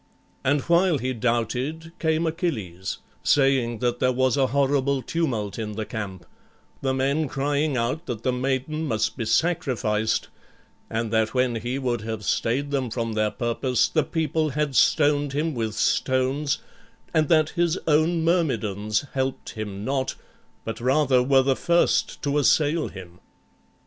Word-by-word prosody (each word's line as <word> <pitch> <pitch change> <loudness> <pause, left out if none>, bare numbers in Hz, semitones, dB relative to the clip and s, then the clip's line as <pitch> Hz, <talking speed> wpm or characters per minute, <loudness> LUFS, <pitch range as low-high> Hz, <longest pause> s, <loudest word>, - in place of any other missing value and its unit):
And 145 +2 +2
while 170 0 +3
he 130 0 -2
doubted 125 +7 -1
came 160 0 +1
Achilles, 110 - -3 0.2
saying 135 -4 +2
that 120 -1 0
there 130 - +3
was 130 0 +2
a 135 -2 +3
horrible 140 0 +1
tumult 115 - -2
in 105 -1 -4
the 110 +1 -4
camp, 100 -6 -6 0.6
the 135 - 0
men 140 +4 +1
crying 145 +1 0
out 130 +8 -2
that 115 -3 -4
the 130 - +2
maiden 135 +5 -1
must 110 -2 0
be 120 - -3
sacrificed, 110 -5 0 0.6
and 115 -1 -2
that 110 +2 +1
when 125 -2 +2
he 120 +4 -3
would 125 -4 -1
have 110 -1 -5
stayed 135 +9 0
them 135 -3 -1
from 115 0 -3
their 110 0 +1
purpose, 120 +1 0
the 155 - +1
people 160 -1 -1
had 145 -1 -1
stoned 145 +1 +3
him 155 +3 0
with 110 -3 -3
stones, 130 +2 +1 0.6
and 155 -2 +2
that 155 -2 +4
his 175 0 +1
own 160 +2 +3
Myrmidons 110 - 0
helped 130 0 -2
him 105 -2 -6
not, 135 0 -1 0.5
but 115 +1 -5
rather 130 0 +3
were 135 +1 +4
the 135 0 +2
first 170 +4 +1
to 145 0 +1
assail 150 +2 +3
him. 90 -2 -11
130 Hz, 150 wpm, -24 LUFS, 115-150 Hz, 0.6 s, that